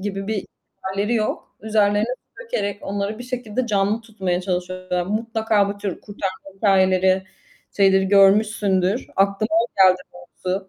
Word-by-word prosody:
gibi 195 0 -4
bir 215 -2 -2 0.4
hâlleri 200 +4 -1
yok. 215 -1 -2
Üzerlerine 210 0 +2
su - - -15
dökerek 205 - -2
onları 200 +2 -3
bir 245 - -7
şekilde 250 -1 -3
canlı 205 0 +1
tutmaya 195 -6 -2
çalışıyorlar. 180 -1 -2
Mutlaka 220 -1 +1
bu 200 0 -5
tür 200 -3 -4
kurtarma 195 -1 -6
hikâyeleri, 190 -1 +3 0.5
şeyleri 190 -1 +4
görmüşsündür. 200 0 +3
Aklıma 200 +2 +1
o 235 - 0 0.2
geldi 185 0 +2
doğrusu 180 +2 -5
200 Hz, 135 wpm, -22 LUFS, 190-215 Hz, 0.5 s, şeyleri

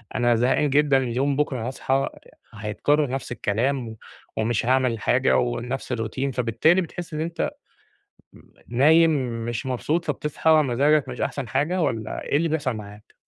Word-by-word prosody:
أنا 120 -1 +3
زهقان 125 +5 +2
جدًا، 145 0 +4
اليوم 135 +2 0
بُكرة 130 -5 -1
هاصحي 135 +1 0 0.5
هيتكرّر 115 +8 0
نفس 130 -1 -4
الكلام 120 +3 -1
و 110 - -10 0.4
ومش 110 +1 0
هاعمل 125 -2 +2
حاجة 130 +4 +2
ونَفس 125 +2 -2
الروتين 125 +3 -2
فبالتالي 125 +10 +2
بتحس 175 0 -7
إن 155 - -2
أنت 165 +1 -2 0.8
مم - - -19 0.2
نايم 160 +7 +5 0.4
مش 120 +3 -3
مبسوط 150 +6 -1
فبتصحى 150 +2 -1
مزاجك 150 0 +3
مش - - -6
أحسَن 135 -6 -3
حاجة 150 +9 0
والّا 110 -8 -2
إيه - - 0
اللي 165 +2 +1
بيحصَل 150 -4 -1
معاك؟ 105 0 -11
130 Hz, 150 wpm, -24 LUFS, 120-150 Hz, 0.8 s, نايم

